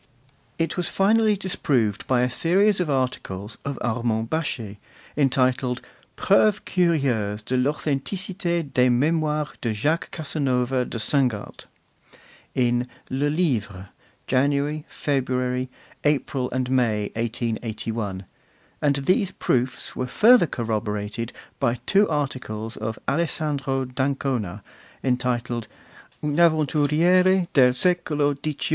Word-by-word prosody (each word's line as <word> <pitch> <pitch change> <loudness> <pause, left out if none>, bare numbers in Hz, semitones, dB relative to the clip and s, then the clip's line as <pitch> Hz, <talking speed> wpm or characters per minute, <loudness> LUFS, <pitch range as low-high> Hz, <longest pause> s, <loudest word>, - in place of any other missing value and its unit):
It 165 +1 -1
was 180 - -1
finally 215 +1 +3
disproved 130 - 0
by 125 -2 +3
a 125 - +3
series 190 +8 +3
of 175 -4 0
articles 120 -7 -2
of 140 -2 -4
Armand 115 -1 -1
Baschet, 120 -10 -3 0.4
entitled 130 -2 +1 0.4
'Preuves 205 +1 +3
curieuses 130 - +1
de 125 +4 -2
l'authenticite 160 +4 -1
des 125 0 +4
Memoires 150 +3 +1
de 115 -2 -1
Jacques 150 +11 0
Casanova 130 -5 -1
de 120 - -6
Seingalt,' 120 -3 -1 0.9
in 120 -1 +1 0.2
'Le 140 +3 +1
Livre,' 110 - -1 0.4
January, 140 +3 +1
February, 130 -2 -1 0.3
April 140 -3 0
and 130 0 -2
May, 110 -5 +1
1881; 110 -3 -3 0.6
and 145 -2 +3
these 180 +8 +2
proofs 125 -5 -1
were 130 - -2
further 220 - +5
corroborated 110 -1 -3 0.3
by 120 -3 +1
two 200 +1 +4
articles 120 -6 -3
of 110 +1 -4
Alessandro 140 -4 0
d'Ancona, 125 -6 -2 0.4
entitled 125 -2 -1 0.6
'Un 150 +1 0
Avventuriere 170 +4 +3
del 125 -3 +5
Secolo 150 -3 +1
XVIII. 145 +1 -3
130 Hz, 105 wpm, -24 LUFS, 120-155 Hz, 0.9 s, further